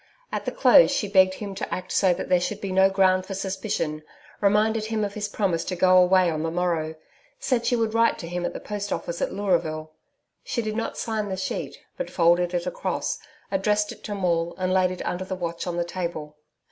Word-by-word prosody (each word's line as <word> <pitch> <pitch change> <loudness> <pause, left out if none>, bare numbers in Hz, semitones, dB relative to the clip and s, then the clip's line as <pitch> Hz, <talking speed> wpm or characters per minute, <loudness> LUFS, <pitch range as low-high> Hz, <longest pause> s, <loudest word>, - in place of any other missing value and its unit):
At - - -3
the - - -1
close - - +6
she 210 - 0
begged 190 -1 +4
him 200 -1 -6
to 190 - -5
act 185 - -4
so 190 - +3
that 175 - -2
there 180 -1 +3
should 205 +3 -2
be 195 -2 -4
no 190 +1 +5
ground 190 -1 +3
for 195 +1 -6
suspicion 190 -5 -2 0.4
reminded 215 +2 +2
him 220 -1 -1
of 200 - -5
his 210 0 -3
promise 190 -5 0
to 185 - -3
go 185 +1 +4
away 180 -1 +4
on 155 -1 -2
the 165 - -1
morrow 165 -2 -1 0.4
said 235 -3 0
she 245 - +3
would 225 -2 0
write 230 0 +3
to 170 - -7
him 175 +1 -3
at - - -2
the - - -5
Post 205 -1 -5
Office 170 0 -3
at - - 0
Leuraville. 165 -6 -1 0.5
She 235 - -2
did 215 0 -3
not 230 - -3
sign 215 -2 -2
the 190 - -3
sheet, 190 - -4 0.2
but - - -4
folded 175 +1 +3
it 175 - -1
across - - -2 0.3
addressed 210 +2 +1
it - - -12
to 205 - -3
Maule 170 -3 0
and 185 0 0
laid 185 -1 +3
it 185 - -6
under 180 +1 -2
the 185 0 -4
watch 170 -1 -4
on 175 -1 -2
the 175 - 0
table. 170 -4 -5
185 Hz, 225 wpm, -25 LUFS, 175-205 Hz, 0.5 s, close